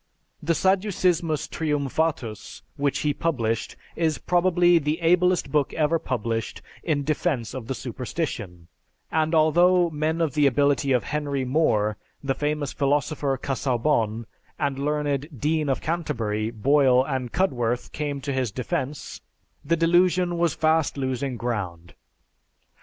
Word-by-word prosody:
"The 165 Hz, +2 st, +1 dB
Sadducismus 180 Hz, -4 st, +1 dB
Triumphatus," 145 Hz, -6 st, -2 dB
which 140 Hz, -1 st, 0 dB
he 150 Hz, -1 st, +1 dB
published, 115 Hz, -9 st, -1 dB, 0.2 s
is 160 Hz, -3 st, 0 dB
probably 175 Hz, +2 st, +3 dB
the 150 Hz, +2 st, -1 dB
ablest 180 Hz, -2 st, +2 dB
book 145 Hz, -2 st, +1 dB
ever 160 Hz, +1 st, +2 dB
published 115 Hz, -4 st, -3 dB, 0.2 s
in 150 Hz, -4 st, 0 dB
defense 145 Hz, -5 st, -1 dB
of 130 Hz, -4 st, -6 dB
the 135 Hz, -, -2 dB
superstition, 115 Hz, -, -5 dB, 0.4 s
and 160 Hz, +1 st, +1 dB
although 175 Hz, +3 st, +4 dB
men 155 Hz, +2 st, -1 dB
of 160 Hz, -5 st, 0 dB
the 150 Hz, -2 st, +4 dB
ability 140 Hz, +1 st, +2 dB
of 125 Hz, -2 st, +2 dB
Henry 145 Hz, -3 st, -2 dB
More, 110 Hz, -7 st, +1 dB, 0.3 s
the 135 Hz, -1 st, 0 dB
famous 150 Hz, 0 st, -2 dB
philosopher 140 Hz, -1 st, 0 dB
Casaubon, 120 Hz, -4 st, 0 dB, 0.3 s
the 145 Hz, -2 st, +2 dB
learned 145 Hz, 0 st, -2 dB
Dean 155 Hz, +1 st, 0 dB
of 135 Hz, -, 0 dB
Canterbury, 115 Hz, -10 st, -2 dB
Boyle 130 Hz, +3 st, +3 dB
and 130 Hz, -4 st, -3 dB
Cudworth, 125 Hz, -9 st, 0 dB
came 145 Hz, -2 st, -3 dB
to 140 Hz, 0 st, -3 dB
his 130 Hz, -3 st, 0 dB
defense, 130 Hz, +5 st, -4 dB, 0.4 s
the 170 Hz, -, +1 dB
delusion 175 Hz, +1 st, +3 dB
was 170 Hz, -3 st, +1 dB
fast 160 Hz, -2 st, +1 dB
losing 130 Hz, -1 st, -2 dB
ground. 95 Hz, -8 st, -4 dB
145 Hz, 130 wpm, -25 LUFS, 125-160 Hz, 0.4 s, although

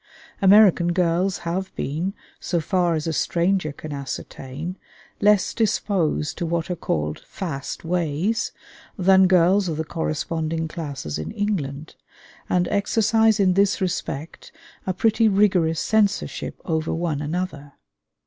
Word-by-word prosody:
American 195 Hz, -3 st, +6 dB
girls 180 Hz, +2 st, +1 dB
have 185 Hz, +3 st, -2 dB
been, 170 Hz, +8 st, -3 dB, 0.2 s
so 175 Hz, -, -1 dB
far 175 Hz, 0 st, +1 dB
as 155 Hz, -, -2 dB
a 165 Hz, -, -1 dB
stranger 175 Hz, 0 st, +1 dB
can 150 Hz, +1 st, -8 dB
ascertain, 140 Hz, +3 st, -6 dB, 0.4 s
less 205 Hz, -2 st, +3 dB
disposed 190 Hz, -8 st, 0 dB
to -, -, -1 dB
what 170 Hz, +1 st, -1 dB
are -, -, -1 dB
called 75 Hz, -, -2 dB
"fast 155 Hz, -5 st, -6 dB
ways" 175 Hz, +5 st, 0 dB, 0.5 s
than 190 Hz, 0 st, +5 dB
girls 185 Hz, +1 st, +4 dB
of 155 Hz, -, -3 dB
the 160 Hz, -, -2 dB
corresponding 160 Hz, 0 st, -2 dB
classes 145 Hz, -, -5 dB
in 80 Hz, +1 st, -4 dB
England, 155 Hz, -8 st, -3 dB, 0.6 s
and 180 Hz, -1 st, +2 dB
exercise 220 Hz, +1 st, +2 dB
in 190 Hz, -2 st, +4 dB
this 200 Hz, +1 st, +2 dB
respect 165 Hz, -4 st, -4 dB, 0.4 s
a 185 Hz, -, +1 dB
pretty 225 Hz, +3 st, +3 dB
rigorous 185 Hz, -6 st, +3 dB
censorship 210 Hz, -2 st, 0 dB
over 160 Hz, -2 st, -1 dB
one 165 Hz, -3 st, -1 dB
another. 150 Hz, -2 st, -4 dB
175 Hz, 130 wpm, -23 LUFS, 155-195 Hz, 0.6 s, American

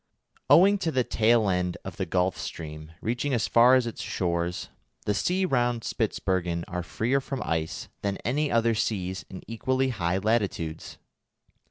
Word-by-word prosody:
Owing 200 Hz, +3 st, +7 dB
to 165 Hz, -4 st, -1 dB
the 130 Hz, -4 st, +2 dB
tail 115 Hz, -1 st, +3 dB
end 90 Hz, -1 st, 0 dB
of -, -, -7 dB
the -, -, -2 dB
Gulf 90 Hz, 0 st, +1 dB
Stream 75 Hz, 0 st, -7 dB
reaching 125 Hz, +4 st, -1 dB
as 115 Hz, -, 0 dB
far 120 Hz, +2 st, +6 dB
as 130 Hz, -2 st, +3 dB
its 115 Hz, -, -5 dB
shores, 85 Hz, -1 st, -2 dB, 0.4 s
the 105 Hz, -, +1 dB
seas 185 Hz, -, +1 dB
round 120 Hz, -6 st, +1 dB
Spitzbergen 90 Hz, -6 st, -1 dB
are 90 Hz, 0 st, -3 dB
freer 120 Hz, +9 st, 0 dB
from 135 Hz, -1 st, -4 dB
ice 80 Hz, -1 st, -2 dB
than 100 Hz, -1 st, -1 dB
any 145 Hz, +5 st, 0 dB
other 115 Hz, 0 st, +3 dB
seas 95 Hz, -4 st, -2 dB
in 95 Hz, -, -9 dB
equally 130 Hz, +3 st, 0 dB
high 90 Hz, -7 st, 0 dB
latitudes. 95 Hz, -7 st, -1 dB
110 Hz, 160 wpm, -27 LUFS, 90-125 Hz, 0.4 s, Owing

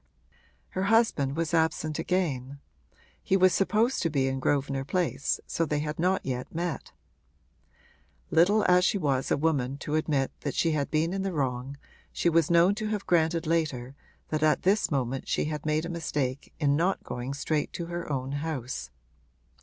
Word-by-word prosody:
Her 190 Hz, +1 st, -2 dB
husband 200 Hz, -, +2 dB
was 165 Hz, 0 st, -2 dB
absent 160 Hz, -1 st, +1 dB
again; 140 Hz, -7 st, -1 dB, 0.6 s
he 190 Hz, -, +2 dB
was 185 Hz, -1 st, +5 dB
supposed 215 Hz, +7 st, +2 dB
to 165 Hz, -, +1 dB
be 135 Hz, -3 st, +1 dB
in 135 Hz, 0 st, -1 dB
Grosvenor 135 Hz, 0 st, 0 dB
Place, 170 Hz, -1 st, -1 dB
so -, -, -3 dB
that 160 Hz, -, -3 dB
they 150 Hz, -, +1 dB
had 150 Hz, +1 st, -4 dB
not 185 Hz, +3 st, +1 dB
yet 125 Hz, -1 st, -3 dB
met. 170 Hz, -2 st, -3 dB, 1.4 s
Little 205 Hz, +6 st, +4 dB
as 180 Hz, 0 st, +5 dB
she 200 Hz, -, +2 dB
was 140 Hz, -7 st, 0 dB
a -, -, +2 dB
woman 140 Hz, -4 st, 0 dB
to 145 Hz, +1 st, -5 dB
admit 150 Hz, -4 st, +1 dB
that 140 Hz, -, -4 dB
she 165 Hz, -, +2 dB
had 145 Hz, -2 st, -1 dB
been 160 Hz, +3 st, +1 dB
in 195 Hz, -, -2 dB
the 190 Hz, -1 st, -2 dB
wrong 135 Hz, -2 st, -2 dB, 0.3 s
she 175 Hz, -, +1 dB
was 165 Hz, -2 st, +3 dB
known 170 Hz, +3 st, +5 dB
to 215 Hz, -, -1 dB
have 210 Hz, -2 st, -2 dB
granted 165 Hz, 0 st, +2 dB
later 150 Hz, -6 st, -1 dB, 0.4 s
that 155 Hz, -1 st, -1 dB
at 155 Hz, -1 st, +3 dB
this 200 Hz, +4 st, +2 dB
moment 135 Hz, -2 st, -2 dB
she -, -, 0 dB
had 150 Hz, 0 st, -4 dB
made 155 Hz, +1 st, +1 dB
a -, -, -4 dB
mistake 150 Hz, -6 st, -3 dB
in 145 Hz, -1 st, +3 dB
not 180 Hz, +5 st, +1 dB
going 125 Hz, +3 st, -5 dB
straight 150 Hz, +1 st, -1 dB
to 170 Hz, -, -4 dB
her 170 Hz, -2 st, -5 dB
own 130 Hz, -1 st, -2 dB
house. 140 Hz, -, -4 dB
155 Hz, 180 wpm, -28 LUFS, 140-175 Hz, 1.4 s, was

